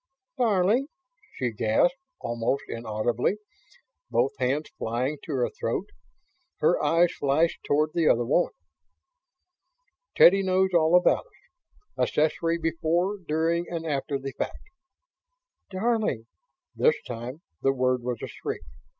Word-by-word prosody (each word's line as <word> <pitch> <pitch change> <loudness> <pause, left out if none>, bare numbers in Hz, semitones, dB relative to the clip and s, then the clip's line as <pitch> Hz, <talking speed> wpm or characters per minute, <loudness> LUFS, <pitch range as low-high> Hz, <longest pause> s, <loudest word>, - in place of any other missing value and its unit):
"Darling?" 220 +3 +3 0.5
she 125 -2 -1
gasped, 110 - +2 0.3
almost 120 +3 -1
inaudibly, 115 - -1 0.7
both - - +2
hands 135 +4 -1
flying 125 +6 -2
to - - -8
her 125 -3 +1
throat. - - -3 0.7
Her - - +2
eyes 170 +1 +4
flashed 145 +4 +1
toward 155 +2 +1
the 165 -2 +2
other 120 0 +3
woman. 150 +8 +2 1.6
"Teddy 195 +3 +7
knows 190 0 +2
all 165 0 +4
about 180 - +3 0.7
us - - +4
accessory 165 +2 +1
before, 170 +4 0
during 165 +2 0
and 165 -1 -4
after 140 -2 -1
the 135 0 -6
fact." - - -3 1.1
"Darling!" 205 - 0 0.5
This 470 - +4
time, 125 +6 -7 0.2
the 135 - +3
word 130 -1 +1
was 120 -1 -4
a - - -3
shriek. - - -5
155 Hz, 120 wpm, -26 LUFS, 125-175 Hz, 1.6 s, Teddy